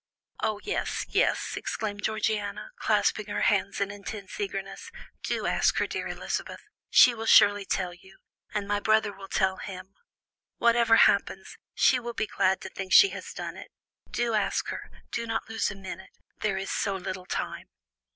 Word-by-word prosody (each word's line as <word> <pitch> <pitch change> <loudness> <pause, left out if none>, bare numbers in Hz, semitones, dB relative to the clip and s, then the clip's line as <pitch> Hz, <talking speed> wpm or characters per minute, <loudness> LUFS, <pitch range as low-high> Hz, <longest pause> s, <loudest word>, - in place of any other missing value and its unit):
"Oh, 215 -1 0
yes, 420 - -2
yes," - - +1
exclaimed 205 -2 -4
Georgiana, 215 - -2
clasping 215 - +1
her 205 0 -2
hands 200 -2 +1
in 200 0 -1
intense 205 - -8
eagerness, 405 -1 -5 0.3
"do - - -2
ask - - +2
her, - - +2
dear - - -4
Elizabeth; - - -4 0.3
she 245 - +7
will 225 -1 -5
surely 205 0 +6
tell 180 -2 -1
you, 190 +2 -17 0.3
and 205 -1 -2
my 205 0 +1
brother 215 -1 +2
will 195 0 -10
tell 190 0 +1
him. 190 -1 -8 0.6
Whatever 235 -1 +4
happens, - - +3 0.2
she 255 - +4
will 235 -1 -6
be - - 0
glad 190 -2 +1
to 190 - -6
think 190 0 -7
she 395 - +9
has - - -7
done - - -6
it. - - -10 0.4
Do 240 -1 -1
ask 210 -2 0
her; - - -6 0.2
do 230 - -3
not 225 0 -2
lose 225 0 -1
a 200 - -7
minute; 190 -1 -8 0.3
there 200 -3 0
is 195 0 -3
so 195 - -1
little 185 -1 -5
time." - - -4
205 Hz, 170 wpm, -27 LUFS, 195-220 Hz, 0.6 s, she